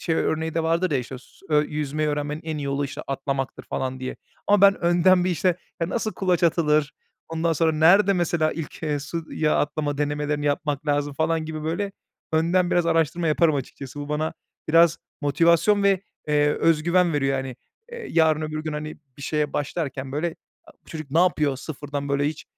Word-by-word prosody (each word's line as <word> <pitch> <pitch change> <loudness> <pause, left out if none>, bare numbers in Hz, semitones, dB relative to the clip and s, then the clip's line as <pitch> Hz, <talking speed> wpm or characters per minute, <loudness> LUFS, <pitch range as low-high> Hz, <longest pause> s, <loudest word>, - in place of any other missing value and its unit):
şey 165 - 0
örneği 160 0 -1
de 165 - +1
vardır 165 +2 +1
ya, 140 - +2
işte, 125 +1 -6
s 195 - -21
ö 150 -1 +4
"Yüzmeyi 150 0 -2
öğrenmenin 150 +1 -2
en 155 -2 -3
iyi - - -4
yolu, 140 +1 -1
işte, 140 - -6
atlamaktır." 135 -1 -3
falan 130 0 -4
diye. 130 - -5 0.3
Ama 205 -1 +4
ben 200 0 +6
önden 175 +1 +4
bir, 185 - +1
işte, 175 +1 +1 0.2
ya, 165 - 0
nasıl 220 0 -2
kulaç 180 -3 0
atılır, 155 -3 +2 0.4
ondan 165 0 0
sonra 160 +1 +2
nerede 185 +6 +5
mesela 170 -3 +1
ilk, 165 -1 -7
eee, 150 -2 0
suya 155 +1 -2
atlama 145 -1 -1
denemelerini 150 0 -1
yapmak 145 0 -1
lazım 145 0 0
falan 160 +2 0
gibi 155 -1 -5
böyle 190 +5 -2 0.4
önden 175 +3 +2
biraz 175 -1 +2
araştırma 165 +1 +1
yaparım 155 0 +3
açıkçası. 140 0 -6
Bu 145 - -6
bana 155 +1 -1 0.4
biraz 165 +1 +5 0.2
motivasyon 170 +7 +3
ve, 195 -2 +3 0.3
eee, 150 0 +3
öz 165 -2 +2
güven 175 0 +3
veriyor, 135 -2 +1
hani. 130 -2 -5 0.4
Eee, 470 -3 -7
yarın, 160 -2 +3
öbür 155 0 -4
gün, 155 - -4
hani, 150 +1 -5 0.2
bir 140 - -11
şeye 150 +1 -1
başlarken, 140 -3 -3
böyle, 160 +3 -2 0.3
a - - -16
"Bu - - -41
çocuk 155 -4 -7
ne 160 - +2
yapıyor? 150 -6 +2
Sıfırdan, 145 0 -5
böyle, 140 0 +1
hiç, 155 - -7
155 Hz, 190 wpm, -24 LUFS, 145-170 Hz, 0.4 s, ben